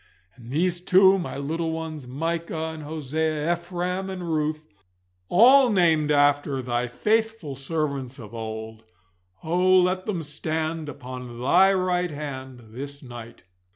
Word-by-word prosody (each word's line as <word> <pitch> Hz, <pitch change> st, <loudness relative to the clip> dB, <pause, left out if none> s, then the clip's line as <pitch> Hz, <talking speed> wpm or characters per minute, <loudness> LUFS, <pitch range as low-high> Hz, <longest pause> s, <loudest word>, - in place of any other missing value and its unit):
And 120 Hz, -1 st, -13 dB
these 175 Hz, +5 st, 0 dB
too, 190 Hz, +1 st, +5 dB
my 175 Hz, -, -5 dB
little 160 Hz, +4 st, -2 dB
ones, 160 Hz, -4 st, -5 dB
Micah 160 Hz, +3 st, -3 dB
and 160 Hz, -, -8 dB
Hosea, 155 Hz, +1 st, -1 dB
Ephraim 180 Hz, +2 st, -3 dB
and 180 Hz, -3 st, -4 dB
Ruth, 155 Hz, 0 st, -1 dB, 0.7 s
all 255 Hz, +7 st, +7 dB
named 165 Hz, -7 st, +3 dB
after 145 Hz, -1 st, +3 dB
Thy 125 Hz, -1 st, -1 dB
faithful 220 Hz, -, 0 dB
servants 135 Hz, -2 st, -3 dB
of 110 Hz, -4 st, -11 dB
old, 110 Hz, 0 st, -6 dB, 0.6 s
oh 180 Hz, +3 st, +4 dB
let 185 Hz, +2 st, 0 dB
them 180 Hz, -6 st, -2 dB
stand 155 Hz, +1 st, -3 dB
upon 125 Hz, -3 st, -8 dB
Thy 180 Hz, +10 st, +5 dB
right 180 Hz, -1 st, +1 dB
hand 130 Hz, -6 st, -7 dB
this 140 Hz, +4 st, -8 dB
night! 120 Hz, -4 st, -10 dB
155 Hz, 130 wpm, -25 LUFS, 135-175 Hz, 0.7 s, all